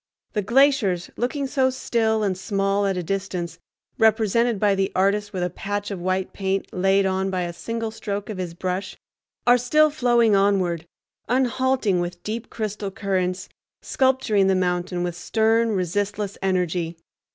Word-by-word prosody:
The 210 Hz, -, 0 dB
glaciers, 230 Hz, -6 st, +2 dB
looking 275 Hz, +4 st, -1 dB
so 265 Hz, -1 st, +2 dB
still 225 Hz, -4 st, 0 dB
and 195 Hz, -2 st, 0 dB
small 195 Hz, +1 st, 0 dB
at 190 Hz, -1 st, -1 dB
a 180 Hz, -, -2 dB
distance, 180 Hz, -2 st, -3 dB, 0.4 s
represented 225 Hz, 0 st, +3 dB
by 205 Hz, -1 st, +3 dB
the 195 Hz, 0 st, 0 dB
artist 205 Hz, +2 st, +1 dB
with 185 Hz, -2 st, -2 dB
a 180 Hz, -, 0 dB
patch 205 Hz, +3 st, -4 dB
of 190 Hz, -3 st, -5 dB
white 185 Hz, +1 st, -1 dB
paint 195 Hz, 0 st, -1 dB
laid 195 Hz, +1 st, +3 dB
on 190 Hz, 0 st, 0 dB
by 185 Hz, -1 st, -1 dB
a 175 Hz, -1 st, -3 dB
single 230 Hz, +5 st, -4 dB
stroke 205 Hz, -2 st, -4 dB
of 210 Hz, -4 st, -6 dB
his 175 Hz, -2 st, -4 dB
brush, 185 Hz, +2 st, -3 dB, 0.5 s
are 245 Hz, +1 st, +6 dB
still 305 Hz, +5 st, +4 dB
flowing 240 Hz, -6 st, +3 dB
onward, 185 Hz, -4 st, +1 dB, 0.4 s
unhalting, 255 Hz, -5 st, +1 dB
with 175 Hz, 0 st, -4 dB
deep 220 Hz, +2 st, -4 dB
crystal 210 Hz, -2 st, -4 dB
currents, 185 Hz, -2 st, -2 dB, 0.4 s
sculpturing 260 Hz, -7 st, +2 dB
the 190 Hz, -, +3 dB
mountain 180 Hz, -1 st, -1 dB
with 175 Hz, -1 st, -3 dB
stern, 225 Hz, +5 st, +2 dB
resistless 200 Hz, +2 st, -2 dB
energy. 180 Hz, -3 st, -1 dB
200 Hz, 155 wpm, -23 LUFS, 185-225 Hz, 0.5 s, are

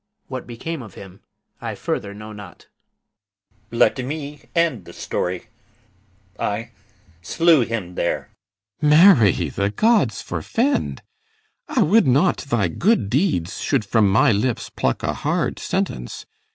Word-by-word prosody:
What 130 Hz, -2 st, -6 dB
became 140 Hz, +6 st, -5 dB
of 110 Hz, -5 st, -12 dB
him 95 Hz, -1 st, -12 dB, 0.4 s
I -, -, -4 dB
further 100 Hz, -, -3 dB
know 105 Hz, +1 st, -9 dB
not. 105 Hz, -4 st, -12 dB, 1.0 s
GUIDERIUS. 115 Hz, -, -6 dB, 0.2 s
Let -, -, -2 dB
me 145 Hz, 0 st, -6 dB
end 160 Hz, -, +1 dB
the -, -, -12 dB
story: 90 Hz, +3 st, -3 dB, 0.9 s
I 115 Hz, +3 st, -2 dB, 0.5 s
slew 165 Hz, -, +3 dB
him 110 Hz, -6 st, -3 dB
there. 85 Hz, -, -2 dB, 0.5 s
CYMBELINE. 150 Hz, -, +3 dB, 0.3 s
Marry, 100 Hz, -6 st, +2 dB
the 100 Hz, 0 st, -1 dB
gods 200 Hz, -, +2 dB
forfend! 230 Hz, -, -1 dB, 0.6 s
I 240 Hz, -, +2 dB
would 210 Hz, +4 st, +4 dB
not 140 Hz, +9 st, +3 dB
thy 120 Hz, -9 st, 0 dB
good 170 Hz, -, +1 dB
deeds 125 Hz, -, 0 dB
should 135 Hz, -7 st, 0 dB
from 105 Hz, 0 st, +3 dB
my 110 Hz, -, +4 dB
lips 110 Hz, +3 st, -1 dB
Pluck -, -, -1 dB
a -, -, 0 dB
hard -, -, -1 dB
sentence. -, -, -3 dB
115 Hz, 135 wpm, -21 LUFS, 100-155 Hz, 1.0 s, would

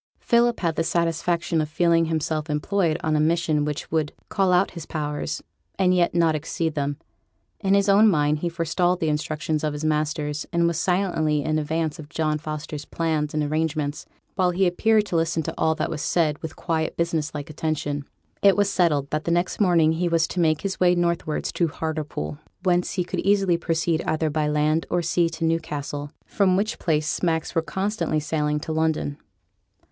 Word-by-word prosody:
Philip 235 Hz, 0 st, +2 dB
had 165 Hz, -3 st, 0 dB
the 165 Hz, -, +2 dB
satisfaction 170 Hz, 0 st, 0 dB
of 150 Hz, -, -3 dB
feeling 165 Hz, +1 st, +3 dB
himself 155 Hz, -1 st, -2 dB
employed 160 Hz, +2 st, +1 dB
on 155 Hz, -1 st, +1 dB
a -, -, +2 dB
mission 155 Hz, -1 st, +2 dB
which 150 Hz, -1 st, -4 dB
would 155 Hz, -2 st, 0 dB, 0.2 s
call 190 Hz, -2 st, +2 dB
out 180 Hz, +2 st, +3 dB
his 170 Hz, -3 st, -8 dB
powers, 150 Hz, -2 st, -3 dB, 0.3 s
and 185 Hz, -1 st, +3 dB
yet 175 Hz, -1 st, +2 dB
not 165 Hz, -2 st, +3 dB
exceed 160 Hz, +1 st, -2 dB
them. 145 Hz, -1 st, -2 dB, 0.6 s
In 195 Hz, -1 st, +2 dB
his 200 Hz, 0 st, +3 dB
own 205 Hz, +2 st, +6 dB
mind 150 Hz, -4 st, +2 dB
he 175 Hz, -, -1 dB
forestalled 175 Hz, +2 st, 0 dB
the 160 Hz, -, 0 dB
instructions 155 Hz, +1 st, -2 dB
of 150 Hz, -1 st, 0 dB
his 150 Hz, +1 st, -4 dB
masters, 150 Hz, -1 st, -1 dB
and 170 Hz, 0 st, +2 dB
was 170 Hz, -1 st, 0 dB
silently 165 Hz, -5 st, +1 dB
in 155 Hz, 0 st, 0 dB
advance 160 Hz, +1 st, -2 dB
of 150 Hz, -1 st, -9 dB
John 155 Hz, -2 st, -1 dB
Foster's 150 Hz, -1 st, -5 dB
plans 155 Hz, -3 st, -2 dB
and 155 Hz, -, +1 dB
arrangements, 150 Hz, -1 st, -2 dB, 0.3 s
while 185 Hz, -3 st, +2 dB
he 185 Hz, +2 st, +2 dB
appeared 215 Hz, +4 st, +3 dB
to 180 Hz, -, -4 dB
listen 165 Hz, 0 st, +1 dB
to -, -, -4 dB
all 160 Hz, 0 st, +1 dB
that 155 Hz, -, -2 dB
was 150 Hz, -, -3 dB
said 155 Hz, -2 st, +1 dB
with 160 Hz, -, -6 dB
quiet 160 Hz, -2 st, -2 dB
business 160 Hz, -2 st, -1 dB
like 145 Hz, +1 st, -5 dB
attention. 145 Hz, -2 st, -2 dB, 0.4 s
It 200 Hz, -1 st, +5 dB
was 200 Hz, -1 st, +2 dB
settled 150 Hz, -7 st, +1 dB
that 155 Hz, 0 st, -2 dB
the -, -, -1 dB
next 175 Hz, +1 st, 0 dB
morning 170 Hz, -5 st, +4 dB
he 170 Hz, +2 st, 0 dB
was 165 Hz, -1 st, +2 dB
to 180 Hz, -, -3 dB
make 155 Hz, -3 st, +2 dB
his 195 Hz, -1 st, -3 dB
way 180 Hz, -1 st, +4 dB
northwards 170 Hz, -3 st, -1 dB
to 170 Hz, -, +1 dB
Hartlepool, 155 Hz, -1 st, -4 dB, 0.2 s
whence 180 Hz, -2 st, +1 dB
he 185 Hz, -, 0 dB
could 175 Hz, -, -4 dB
easily 195 Hz, -3 st, +3 dB
proceed 165 Hz, -1 st, 0 dB
either 155 Hz, -1 st, 0 dB
by 150 Hz, 0 st, 0 dB
land 150 Hz, +2 st, +1 dB
or 175 Hz, 0 st, 0 dB
sea 170 Hz, 0 st, +2 dB
to 165 Hz, -, -3 dB
Newcastle, 145 Hz, -3 st, -2 dB
from 190 Hz, -3 st, +2 dB
which 215 Hz, +3 st, -1 dB
place 155 Hz, -2 st, 0 dB
smacks 160 Hz, 0 st, -1 dB
were 165 Hz, -, +2 dB
constantly 190 Hz, -2 st, -1 dB
sailing 150 Hz, 0 st, -1 dB
to 160 Hz, -, -5 dB
London. 155 Hz, -2 st, -1 dB
160 Hz, 195 wpm, -24 LUFS, 150-175 Hz, 0.6 s, own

